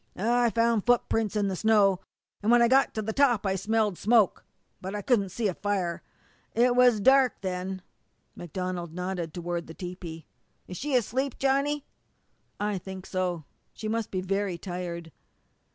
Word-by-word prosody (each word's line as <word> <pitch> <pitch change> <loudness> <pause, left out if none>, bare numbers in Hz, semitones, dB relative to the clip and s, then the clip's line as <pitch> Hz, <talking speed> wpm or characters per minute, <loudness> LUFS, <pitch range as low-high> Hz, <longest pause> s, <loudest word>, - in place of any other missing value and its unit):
"I 240 +4 +2
found 230 -2 +2
footprints 225 -3 +1
in 205 -1 +1
the 190 - -1
snow, 200 -2 +3 0.4
an' 210 - 0
when 240 0 +6
I - - +5
got 265 +3 +3
to 220 - -2
the 220 +1 -3
top 245 -6 +3
I 190 - +1
smelled 210 0 0
smoke, 220 -3 +3 0.4
but 190 +2 -5
couldn't 205 -7 +2
see 215 +4 -1
a 190 - -1
fire. 185 -3 -2 0.5
It 245 +1 +4
was 245 -3 +5
dark 265 +2 +4
then." 185 0 -4 0.5
MacDonald 175 -1 -5
nodded 180 -2 -3
toward 175 0 -4
the 160 - -10
tepee. 175 -3 -7 0.4
"Is 180 - -7
she 285 +4 -1
asleep, 255 +3 0
Johnny?" 275 +2 +1 0.7
"I 205 -2 -1
think 190 0 -8
so. 180 -4 -2 0.3
She 215 - -6
must 225 0 -1
be 185 - -2
very 195 -1 -1
tired." 175 -2 -6
200 Hz, 160 wpm, -27 LUFS, 180-235 Hz, 0.7 s, when